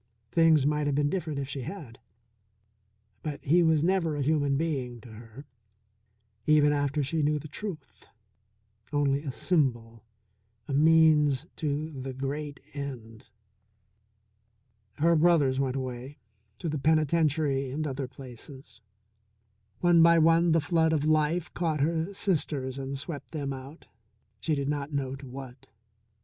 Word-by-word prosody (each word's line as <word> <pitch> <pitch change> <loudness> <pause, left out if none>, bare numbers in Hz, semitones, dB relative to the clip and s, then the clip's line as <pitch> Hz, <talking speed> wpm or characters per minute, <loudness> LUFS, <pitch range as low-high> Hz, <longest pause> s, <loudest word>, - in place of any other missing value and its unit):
Things 160 -4 +4
might 150 0 +1
have 145 - 0
been 145 0 +1
different 165 -6 -3
if 140 -1 -3
she 135 0 -5
had. 125 - -8 1.2
But 145 -2 -6
he 170 +5 +4
was 160 -2 +3
never 170 -3 +1
a 145 - -1
human 145 -1 +1
being 135 -7 -2
to 125 - -13
her, 115 +5 -12 1.0
even 150 -1 +5
after 145 0 0
she 155 +4 -1
knew 150 +1 +2
the 150 +1 -8
truth; 155 - -8 0.8
only 145 -1 +1
a 145 -3 -4
symbol, 120 - -1 0.6
a 140 - -4
means 155 -2 +4
to 150 0 -2
the 135 -2 -6
great 140 +2 -4
end. 125 -6 -8 1.6
Her 165 +3 +3
brothers 155 -5 +3
went 135 -1 0
away 130 +1 -5 0.4
to 170 - -5
the 155 -2 -2
penitentiary 155 -2 +1
and 150 +4 -3
other 135 -2 -3
places. 130 -2 -12 1.0
One 175 -1 +5
by 170 0 +6
one 165 +1 +4
the 165 0 +3
flood 160 +1 +2
of 150 -2 0
life 155 +2 +1
caught 160 -4 -1
her 165 +4 0
sisters 145 -9 -1
and 135 0 -4
swept 140 +1 -7
them 140 -3 -3
out, 135 +4 -10 0.5
she 155 - 0
did 140 -1 -2
not 145 0 -2
know 135 -2 -2
to 135 0 -11
what. 130 0 -10
145 Hz, 140 wpm, -28 LUFS, 135-160 Hz, 1.6 s, by